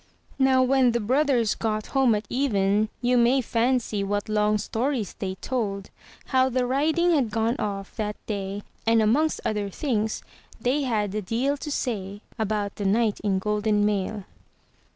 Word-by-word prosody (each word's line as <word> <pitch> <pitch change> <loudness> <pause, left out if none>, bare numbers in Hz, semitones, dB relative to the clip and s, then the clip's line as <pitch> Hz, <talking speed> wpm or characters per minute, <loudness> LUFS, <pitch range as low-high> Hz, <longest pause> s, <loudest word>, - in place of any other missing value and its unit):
Now, 265 -1 +4
when 255 -2 +3
the 235 - +1
brothers 250 -1 +2
got 215 -1 -2
home 265 -5 +4
at 210 - -3
even, 210 -5 +1
you 245 0 +3
may 240 +3 +4
fancy 235 -3 0
what 205 +1 -2
long 210 0 +2
stories 230 0 -2
they 190 -2 -3
told, 200 -4 -3 0.3
how 260 0 +2
the 255 0 0
riding 315 +7 +2
had 275 -8 +2
gone 225 +2 0
off 195 -2 -4
that 210 -1 -2
day; 200 -1 -4 0.2
and 225 0 +5
amongst 265 +9 +2
other 210 -2 -1
things, 220 -1 -2 0.4
they 250 +6 +1
had 215 -7 -1
a 215 - -1
deal 240 +8 0
to 300 - -6
say 205 -7 -3 0.2
about 210 -2 -1
the 205 - -3
knight 215 +2 +2
in 200 -2 0
golden 210 +1 +1
mail. 205 0 -1
220 Hz, 160 wpm, -25 LUFS, 205-255 Hz, 0.4 s, and